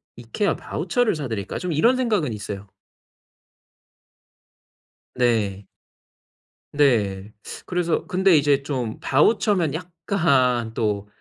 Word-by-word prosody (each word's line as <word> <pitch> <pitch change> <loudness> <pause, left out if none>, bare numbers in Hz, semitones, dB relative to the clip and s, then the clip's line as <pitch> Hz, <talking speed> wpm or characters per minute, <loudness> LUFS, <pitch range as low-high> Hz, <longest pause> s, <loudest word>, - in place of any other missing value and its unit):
'이케아 120 - -2
바우처를 220 +6 -1
사 150 -3 -4
드릴까?' 105 -5 -4
좀 180 -1 -3
이런 230 - +3
생각은 210 - 0
있어요. 105 -1 -7 2.5
네. 110 -5 0 1.1
네. 105 -9 +1 0.3
그래서 175 -2 -1
근데 190 -2 +3
이제 145 -2 +3
좀 125 -6 -4
바우처면 180 - +2
약간 160 - 0
또 105 -3 -2
140 Hz, 200 characters per minute, -23 LUFS, 110-180 Hz, 2.5 s, 이런